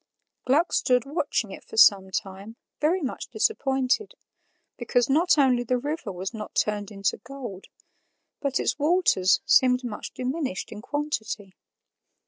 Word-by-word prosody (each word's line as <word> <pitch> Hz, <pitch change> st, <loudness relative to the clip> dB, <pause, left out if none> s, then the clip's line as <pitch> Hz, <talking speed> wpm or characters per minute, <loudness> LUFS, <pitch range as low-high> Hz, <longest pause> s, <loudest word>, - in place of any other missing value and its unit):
Gluck 300 Hz, +7 st, +2 dB
stood 250 Hz, -2 st, +2 dB
watching 285 Hz, -, -2 dB
it -, -, -10 dB
for -, -, -11 dB
some 195 Hz, -3 st, +6 dB
time, 195 Hz, +3 st, -5 dB, 0.2 s
very 330 Hz, +4 st, +1 dB
much 260 Hz, -, -4 dB
disappointed, 270 Hz, -, 0 dB, 0.6 s
because 245 Hz, +1 st, 0 dB
not 330 Hz, +4 st, +4 dB
only 260 Hz, -4 st, +4 dB
the 250 Hz, +1 st, 0 dB
river 290 Hz, -4 st, -4 dB
was 190 Hz, +3 st, -5 dB
not 215 Hz, -2 st, -8 dB
turned 210 Hz, -1 st, 0 dB
into 195 Hz, -2 st, -2 dB
gold, 250 Hz, -9 st, -9 dB, 0.7 s
but 280 Hz, -2 st, -1 dB
its -, -, -1 dB
waters 290 Hz, -, +3 dB
seemed 250 Hz, 0 st, +4 dB
much 225 Hz, -4 st, -5 dB
diminished 260 Hz, -, -3 dB
in 210 Hz, -1 st, -8 dB
quantity. 220 Hz, -8 st, -4 dB
250 Hz, 135 wpm, -25 LUFS, 210-290 Hz, 0.7 s, some